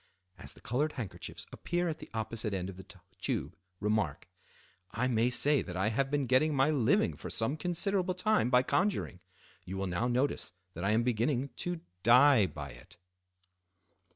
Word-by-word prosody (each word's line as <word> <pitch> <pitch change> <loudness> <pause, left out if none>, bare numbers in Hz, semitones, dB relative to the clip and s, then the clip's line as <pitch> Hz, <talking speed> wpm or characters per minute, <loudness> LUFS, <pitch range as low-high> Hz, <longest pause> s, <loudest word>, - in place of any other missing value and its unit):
As - - -7
the - - -17
colored 145 +6 -1
handkerchiefs 115 -7 -6
appear 175 0 -2
at 160 -1 -3
the - - -10
opposite 110 -1 -3
end 95 0 -3
of 90 - -14
the 95 0 -11 0.3
tube, 75 +7 -2 0.2
remark:—"I 95 - -4
may 120 -1 +2
say 140 +3 +4
that 90 -2 -6
I 95 +3 +1
have 135 +5 0
been 145 -1 0
getting 130 +5 +3
my 135 +3 +3
living 150 - +2
for - - -8
some 115 +6 -1
considerable 180 +3 0
time 215 - +2
by 125 0 +5
conjuring. 160 - 0 0.4
You 95 +2 -6
will 95 - -1
now 90 +6 -1
notice 125 -5 -1 0.2
that 85 - -6
I 100 - +1
am 110 +2 +3
beginning 125 +3 0
to 175 -2 -3 0.2
dye 120 0 +6
by 75 -6 -7
it." - - -15
125 Hz, 170 wpm, -31 LUFS, 100-145 Hz, 0.4 s, dye